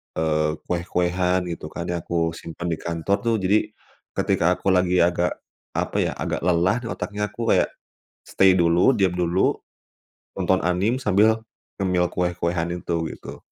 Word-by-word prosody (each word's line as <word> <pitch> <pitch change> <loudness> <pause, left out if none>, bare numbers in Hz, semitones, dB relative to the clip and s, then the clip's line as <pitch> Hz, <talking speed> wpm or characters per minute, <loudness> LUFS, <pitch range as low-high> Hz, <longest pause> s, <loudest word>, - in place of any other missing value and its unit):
eee, 75 -1 +1
kue-kuean 90 +1 0
gitu 85 - -6
kan, - - -6
ya, 85 - -1
aku 85 0 -1
simpan 85 +1 -6
di 80 - -2
kantor, 85 +4 -1
tuh. 115 -2 +1
Jadi, 105 +1 +2 0.5
ketika 90 +2 +2
aku 95 - 0
lagi 90 -1 +2
agak, 85 0 +1 0.4
apa - - -1
ya, - - +1
agak - - -2
lelah 90 +4 +2
di - - -5
otaknya, 105 -1 -3
aku 115 +3 -2
kayak - - +4 0.6
stay 95 0 +4
dulu, 85 +7 +4
diam 95 -4 +1
dulu, 90 +1 +1 0.8
tonton - - +1
anime, 90 +7 +1
sambil 110 -2 +2 0.3
ngemil 90 -2 +1
kue-kuean 85 -1 -1
itu, 85 -1 -3 0.2
gitu. - - -10
90 Hz, 150 wpm, -23 LUFS, 85-95 Hz, 0.8 s, kayak